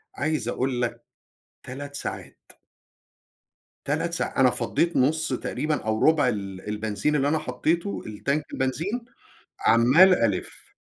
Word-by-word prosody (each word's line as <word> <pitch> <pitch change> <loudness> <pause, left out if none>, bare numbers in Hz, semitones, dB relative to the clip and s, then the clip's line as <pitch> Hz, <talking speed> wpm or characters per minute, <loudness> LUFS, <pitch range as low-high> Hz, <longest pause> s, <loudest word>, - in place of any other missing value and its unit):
عايز 155 -5 -1
أقول 125 0 -1
لك 120 - -3 0.6
3 140 +2 -7
ساعات. - - -6 1.5
3 - - -1
ساع - - -2
أنا - - +6
فَضّيت 170 0 0
نص 160 +5 +2
تقريبًا 150 0 -2
أو 110 0 0
ربع 155 -4 +4
ال 100 -4 -4
البنزين 105 +6 -1
اللي 140 0 +1
أنا 160 +2 +2
حطيته 170 +5 -1
الTank 140 +8 -2
البنزين، 165 - -2 0.6
عمّال 130 +12 +6
ألِف. 100 -5 -3
135 Hz, 120 wpm, -25 LUFS, 115-155 Hz, 1.5 s, أنا